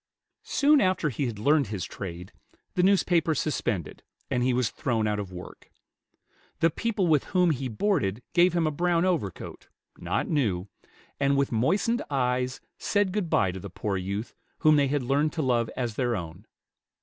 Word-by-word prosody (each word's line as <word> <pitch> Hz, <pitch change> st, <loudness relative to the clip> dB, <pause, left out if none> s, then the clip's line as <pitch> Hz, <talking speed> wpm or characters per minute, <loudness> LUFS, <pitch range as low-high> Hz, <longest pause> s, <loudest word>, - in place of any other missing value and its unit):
Soon 295 Hz, 0 st, +4 dB
after 185 Hz, -5 st, +1 dB
he 135 Hz, +1 st, -2 dB
had 115 Hz, -3 st, -5 dB
learned 140 Hz, +4 st, +3 dB
his 95 Hz, -5 st, -4 dB
trade, 90 Hz, 0 st, -7 dB, 0.4 s
the 180 Hz, -, +1 dB
newspaper 175 Hz, -4 st, +3 dB
suspended, 115 Hz, -, -2 dB, 0.3 s
and 125 Hz, -, +1 dB
he 130 Hz, +1 st, +2 dB
was 125 Hz, -2 st, +1 dB
thrown 120 Hz, -7 st, -1 dB
out 105 Hz, -1 st, 0 dB
of 100 Hz, -3 st, -5 dB
work. 90 Hz, 0 st, -10 dB, 0.9 s
The 165 Hz, -, +3 dB
people 210 Hz, +1 st, -1 dB
with 155 Hz, -5 st, +3 dB
whom 180 Hz, -3 st, +2 dB
he 135 Hz, -2 st, -2 dB
boarded 115 Hz, -, 0 dB
gave 175 Hz, 0 st, +5 dB
him 170 Hz, -2 st, +1 dB
a 155 Hz, -, +1 dB
brown 170 Hz, +3 st, +1 dB
overcoat, 160 Hz, -, -3 dB, 0.3 s
not -, -, -1 dB
new, 105 Hz, -, 0 dB, 0.5 s
and 140 Hz, 0 st, +2 dB
with 140 Hz, -1 st, +1 dB
moistened 190 Hz, -, +1 dB
eyes 125 Hz, -2 st, 0 dB, 0.2 s
said 205 Hz, -2 st, +1 dB
good 200 Hz, -5 st, -1 dB
by 95 Hz, -, +2 dB
to 95 Hz, -, -7 dB
the 100 Hz, -, -8 dB
poor 100 Hz, +3 st, -3 dB
youth 100 Hz, +4 st, -4 dB, 0.3 s
whom 155 Hz, 0 st, +6 dB
they 145 Hz, -1 st, +3 dB
had 140 Hz, 0 st, 0 dB
learned 145 Hz, +4 st, +1 dB
to 160 Hz, -, -1 dB
love 120 Hz, -3 st, +1 dB
as 120 Hz, -3 st, -2 dB
their 120 Hz, +1 st, 0 dB
own. 90 Hz, +2 st, -7 dB
135 Hz, 175 wpm, -27 LUFS, 105-170 Hz, 0.9 s, whom